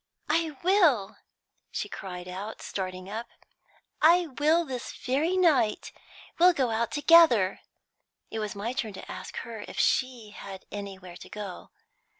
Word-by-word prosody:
"I 315 Hz, -2 st, +1 dB
will," 335 Hz, -, +3 dB, 0.5 s
she -, -, -3 dB
cried 180 Hz, -2 st, -7 dB
out, 195 Hz, +4 st, -6 dB
starting 185 Hz, -1 st, -5 dB
up, 220 Hz, +4 st, -5 dB, 0.7 s
"I 345 Hz, +3 st, +6 dB
will 320 Hz, +3 st, +4 dB
this 255 Hz, -3 st, -5 dB
very 300 Hz, +8 st, 0 dB
night! 280 Hz, -12 st, +2 dB, 0.5 s
We'll 360 Hz, +1 st, +7 dB
go 260 Hz, -7 st, 0 dB
out 225 Hz, +1 st, 0 dB
together." 290 Hz, -, +5 dB, 0.7 s
It 220 Hz, -, -3 dB
was 210 Hz, -1 st, -4 dB
my 215 Hz, +5 st, -3 dB
turn 220 Hz, -5 st, -3 dB
to 190 Hz, -, -9 dB
ask 185 Hz, -, -8 dB
her 225 Hz, -3 st, -7 dB
if -, -, -10 dB
she 245 Hz, -5 st, +1 dB
had 195 Hz, -2 st, -9 dB
anywhere 190 Hz, -3 st, -7 dB
to -, -, -12 dB
go 205 Hz, -3 st, -7 dB
to. -, -, -39 dB
230 Hz, 150 wpm, -28 LUFS, 195-305 Hz, 0.7 s, We'll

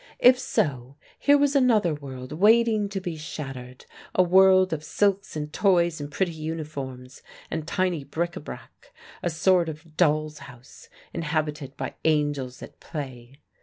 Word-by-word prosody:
If 250 Hz, 0 st, +6 dB
so, 140 Hz, -, -1 dB, 0.2 s
here 285 Hz, 0 st, +5 dB
was 285 Hz, 0 st, +2 dB
another 225 Hz, -, +4 dB
world 130 Hz, -3 st, -8 dB
waiting 215 Hz, +4 st, +4 dB
to 195 Hz, -1 st, -3 dB
be 175 Hz, -4 st, -5 dB
shattered 135 Hz, -5 st, -8 dB, 0.3 s
a 185 Hz, -, +5 dB
world 185 Hz, 0 st, +5 dB
of 155 Hz, -1 st, -4 dB
silks 200 Hz, +4 st, 0 dB
and 150 Hz, 0 st, -5 dB
toys 175 Hz, -5 st, +2 dB
and 145 Hz, 0 st, -6 dB
pretty 185 Hz, +2 st, 0 dB
uniforms 150 Hz, -5 st, -6 dB, 0.3 s
and 160 Hz, -1 st, -3 dB
tiny 180 Hz, -4 st, 0 dB
bric 165 Hz, +5 st, -3 dB
a -, -, -5 dB
brac 150 Hz, -, -11 dB, 0.3 s
a -, -, 0 dB
sort 170 Hz, +1 st, +2 dB
of 155 Hz, 0 st, -10 dB
doll's 155 Hz, -2 st, +2 dB
house 120 Hz, 0 st, -15 dB, 0.2 s
inhabited 150 Hz, -3 st, -3 dB
by -, -, -4 dB
angels 145 Hz, -5 st, 0 dB
at -, -, -12 dB
play. 135 Hz, -2 st, -8 dB
155 Hz, 150 wpm, -25 LUFS, 145-185 Hz, 0.3 s, If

